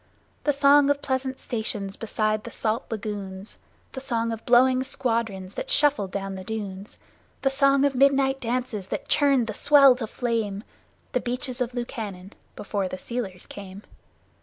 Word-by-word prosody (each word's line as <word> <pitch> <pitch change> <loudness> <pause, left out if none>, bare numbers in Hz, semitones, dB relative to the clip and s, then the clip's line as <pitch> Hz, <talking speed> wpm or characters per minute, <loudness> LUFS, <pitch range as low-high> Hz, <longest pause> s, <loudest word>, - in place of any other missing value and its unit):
The 295 - +4
song 285 0 +5
of 285 0 +1
pleasant 260 0 -2
stations 210 -4 -4
beside 215 -1 -1
the - - -7
salt 225 +2 -2
lagoons, 205 -3 -6 0.3
The 265 - -6
song 230 -3 -1
of 225 -1 -5
blowing 255 +1 +5
squadrons 225 -7 -2
that - - -5
shuffled 290 - +2
down 195 0 -4
the 190 -1 -7
dunes, 200 -1 -6 0.5
The 270 - +3
song 275 0 +4
of 280 - +2
midnight 270 0 +3
dances 235 -5 -2
that - - -4
churned 275 -4 +3
the 220 - -4
sea 280 +2 +7
to 230 -4 -4
flame 220 -4 -2 0.5
The 250 - +1
Beaches 250 +1 -3
of 245 0 -2
Lukannon 210 -6 -5 0.2
before 200 -2 -2
the 185 - -5
sealers 195 -4 -5
came! 200 0 -10
235 Hz, 160 wpm, -25 LUFS, 205-270 Hz, 0.5 s, sea